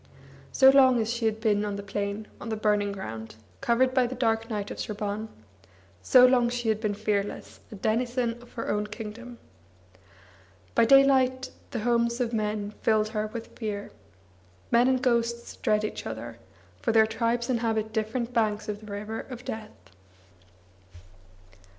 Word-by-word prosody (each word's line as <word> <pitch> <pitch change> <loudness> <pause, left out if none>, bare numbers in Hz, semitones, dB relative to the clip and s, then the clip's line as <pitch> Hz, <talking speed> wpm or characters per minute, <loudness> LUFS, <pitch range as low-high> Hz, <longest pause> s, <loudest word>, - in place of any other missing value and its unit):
So 265 -1 +7
long 260 -3 +6
as 225 +1 0
she 235 -1 -2
had 220 0 0
been 210 -2 +2
on 205 -1 -2
the 200 - -6
plain, 200 +1 -3 0.2
on 235 - -6
the 220 - -1
burning 210 -1 +1
ground, 110 - -7 0.3
covered 255 +2 +2
by 255 -2 +3
the 255 - -6
dark 225 -2 0
night 205 -2 -3
of - - -7
Sraban, 210 0 -3 0.7
so 250 - +7
long 250 -2 +4
she 240 -1 -2
had 215 0 0
been 210 -2 -1
fearless, 205 -1 -3
a - - -7
denizen 240 +3 -1
of 245 - -16
her 230 - -5
own 210 0 -1
kingdom. 225 +3 -8 1.4
By - - +4
daylight 260 0 +4 0.2
the 235 - -4
homes 235 +1 +1
of 240 -2 -1
men 210 -1 -2
filled 215 -1 +2
her 215 -1 -2
with 225 +1 -8
fear. 210 -3 -5 0.8
Men 240 +2 +5
and 260 -1 +1
ghosts 235 -1 0
dread 210 0 +1
each 215 - -4
other, 115 +1 -7 0.4
for - - +1
their 220 -1 +6
tribes 235 +2 -1
inhabit 225 -3 -1
different 230 +2 -2
banks 215 -3 0
of 210 -1 -4
the 210 -1 -11
river 210 +2 -5
of 250 -1 -9
death. 210 - -8
225 Hz, 160 wpm, -27 LUFS, 210-240 Hz, 1.4 s, So